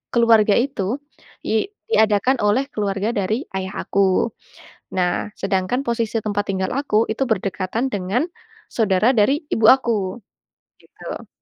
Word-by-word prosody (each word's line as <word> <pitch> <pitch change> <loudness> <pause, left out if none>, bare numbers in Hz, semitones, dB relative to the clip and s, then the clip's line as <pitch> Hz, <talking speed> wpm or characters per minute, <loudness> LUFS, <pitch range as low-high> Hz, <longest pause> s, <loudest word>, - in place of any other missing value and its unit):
keluarga 225 -3 +5
itu 235 -4 -1 0.5
di 220 - 0 0.2
diadakan 220 - +3
oleh 210 +7 +2
keluarga 205 +1 -1
dari 215 +5 -1
ayah 190 0 -4
aku. 195 +3 +2 0.6
Nah, 180 -1 0
sedangkan 195 +6 -1
posisi 230 -3 -1
tempat 205 -1 -1
tinggal 190 -1 -1
aku, 275 -7 -1
itu 245 +5 0
berdekatan 195 +3 -1
dengan 195 +4 -1 0.5
saudara 215 +1 +2
dari 275 +10 +3
ibu 220 -1 +3
aku. 225 -7 +3 0.7
Gitu. - - -9
215 Hz, 120 wpm, -21 LUFS, 195-235 Hz, 0.7 s, keluarga